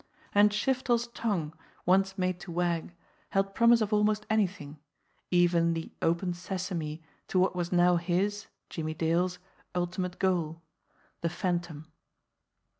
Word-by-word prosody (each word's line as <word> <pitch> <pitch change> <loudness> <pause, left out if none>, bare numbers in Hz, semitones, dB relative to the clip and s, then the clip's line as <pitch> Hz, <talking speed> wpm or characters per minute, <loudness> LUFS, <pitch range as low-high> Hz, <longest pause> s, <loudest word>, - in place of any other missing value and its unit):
And 205 +1 +6
Shiftel's 240 +2 +1
tongue, 195 -10 -2 0.3
once 190 +2 +3
made 185 -1 0
to 175 0 -8
wag, 175 0 -1 0.3
held 195 0 0
promise 235 +1 +5
of 215 0 0
almost 210 0 +2
anything, 190 -8 -1 0.5
even 175 -1 +3
the 165 - -5
"Open 170 +2 +1
Ses 185 +1 -5
ame" 155 -3 -3 0.3
to - - -1
what 185 0 +3
was 175 -1 -2
now 175 0 +4
his, 190 +4 -1 0.2
Jimmie 155 -1 -4
Dale's, 170 +3 +1 0.4
ultimate 180 0 -2
goal 165 -3 0 0.6
the 170 - 0
Phantom. 175 -3 -2
180 Hz, 130 wpm, -29 LUFS, 170-195 Hz, 0.6 s, And